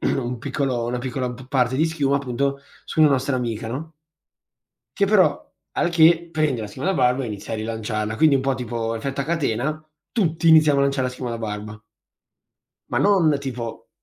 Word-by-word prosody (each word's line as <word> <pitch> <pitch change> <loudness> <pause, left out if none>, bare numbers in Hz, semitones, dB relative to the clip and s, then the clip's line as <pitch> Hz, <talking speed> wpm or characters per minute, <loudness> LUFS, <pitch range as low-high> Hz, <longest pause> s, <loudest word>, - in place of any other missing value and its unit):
un 125 -2 -1
piccolo 130 -2 -2
una 125 +1 -2
piccola 125 0 -3
p 130 +1 -13
parte 130 -2 +1
di 155 - +3
schiuma, 145 -4 +1
appunto, 140 +1 -2 0.2
su - - -2
una 155 - +7
nostra 130 0 +1
amica, 115 -3 -3
no? 150 +8 -6 1.0
Che, 200 - +3
però 185 -8 +3 0.2
al 175 - +1
che, 170 0 +4
prende 155 -7 0
la 110 - -4
schiuma 130 - -4
da 195 - +2
barba 130 -1 +2
e - - -4
inizia 105 0 -6
a - - -2
rilanciarla, 110 0 -3
quindi, 155 +2 +5
un 135 - +3
po' 135 0 +1
tipo 115 -2 -3
effetto 135 +4 -3
a - - -1
catena, 155 -1 -1 0.3
tutti 165 -6 +1
iniziamo 155 -3 +6
a - - +3
lanciare 140 -2 +1
la 125 - -4
schiuma 125 -1 -5
da 115 - -4
barba. 105 -1 -6 1.1
Ma - - 0
non, 175 -8 +4
tipo, 125 -4 -6
135 Hz, 190 wpm, -22 LUFS, 120-155 Hz, 1.1 s, una